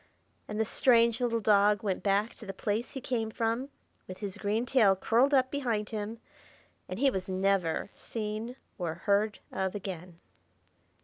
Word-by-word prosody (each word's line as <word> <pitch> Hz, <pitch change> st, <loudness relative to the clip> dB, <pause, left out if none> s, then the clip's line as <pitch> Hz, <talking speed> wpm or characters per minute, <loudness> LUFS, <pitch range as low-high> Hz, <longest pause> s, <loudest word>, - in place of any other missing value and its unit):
And 210 Hz, 0 st, -4 dB
the 220 Hz, -, +2 dB
strange 235 Hz, 0 st, +4 dB
little 235 Hz, -2 st, +1 dB
dog 210 Hz, 0 st, +4 dB
went 195 Hz, -3 st, -1 dB
back 205 Hz, +3 st, +1 dB
to 220 Hz, -, -12 dB
the 195 Hz, -, -5 dB
place 215 Hz, +5 st, -2 dB
he 265 Hz, -, -5 dB
came 230 Hz, -3 st, -1 dB
from, 230 Hz, +4 st, -1 dB, 0.4 s
with 185 Hz, -, -7 dB
his 200 Hz, -3 st, -4 dB
green 215 Hz, +3 st, 0 dB
tail 230 Hz, -7 st, +4 dB
curled 235 Hz, +8 st, +3 dB
up 260 Hz, -2 st, +3 dB
behind 235 Hz, -7 st, -1 dB
him; 220 Hz, +1 st, -4 dB, 0.7 s
and 185 Hz, -, -4 dB
he 270 Hz, +3 st, +3 dB
was 190 Hz, -4 st, -4 dB
never 190 Hz, -2 st, +1 dB
seen 220 Hz, +2 st, -5 dB, 0.2 s
or 165 Hz, -3 st, -2 dB
heard 205 Hz, +4 st, +1 dB
of 190 Hz, +1 st, -2 dB
again. 180 Hz, -3 st, -6 dB
215 Hz, 165 wpm, -30 LUFS, 195-230 Hz, 0.7 s, strange